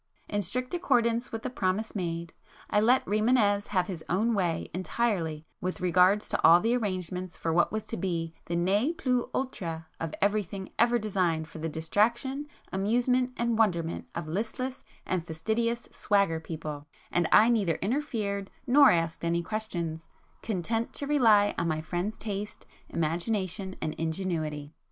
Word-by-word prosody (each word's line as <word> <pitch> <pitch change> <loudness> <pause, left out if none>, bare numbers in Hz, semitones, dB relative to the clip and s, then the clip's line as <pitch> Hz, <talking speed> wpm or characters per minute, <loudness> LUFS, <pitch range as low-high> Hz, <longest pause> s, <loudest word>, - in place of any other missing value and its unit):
In 205 -1 -1
strict 250 - -2
accordance 235 -8 +1
with 225 0 -5
the 255 - -3
promise 205 -1 -1
made, 170 -4 -3 0.4
I 210 - +4
let 245 +4 +4
Rimânez 210 -1 +2
have 185 -3 +1
his 180 -4 -6
own 215 +7 +2
way 175 -6 0
entirely 180 -5 -1 0.2
with 185 +1 -3
regard 180 +3 +4
to - - -3
all 170 +2 +8
the 230 +5 +2
arrangements 185 -5 -3
for 165 - -1
what 175 +1 +3
was 215 0 -3
to 225 - -4
be 165 -3 -2
the 170 - -2
ne 200 - +2
plus 250 -6 0
ultra 170 -11 -3
of 165 -1 -4
everything 200 -2 -1
ever 240 +1 +5
designed 185 -7 0
for 165 - -10
the 165 +1 -2
distraction, 235 - 0 0.3
amusement 245 +6 +2
and 235 -1 0
wonderment 170 -6 +1
of 170 -2 -4
listless 230 +9 -3 0.2
and 185 -3 -1
fastidious 220 +9 -1
'swagger' 200 -6 +1
people, 155 -3 -6 0.2
and 175 -2 +2
I 220 +2 +7
neither 200 -9 +2
interfered, 210 -5 -2 0.2
nor 280 +3 +7
asked 165 -1 0
any 170 0 +1
questions, 170 -7 -4 0.3
content 225 +3 -2
to 285 - -3
rely 225 -8 +4
on 165 - 0
my 155 -1 -1
friend's 175 +6 -3
taste, 210 -1 -5 0.2
imagination 185 +3 -1
and 155 - -2
ingenuity. 160 -3 -2
195 Hz, 155 wpm, -29 LUFS, 170-225 Hz, 0.4 s, all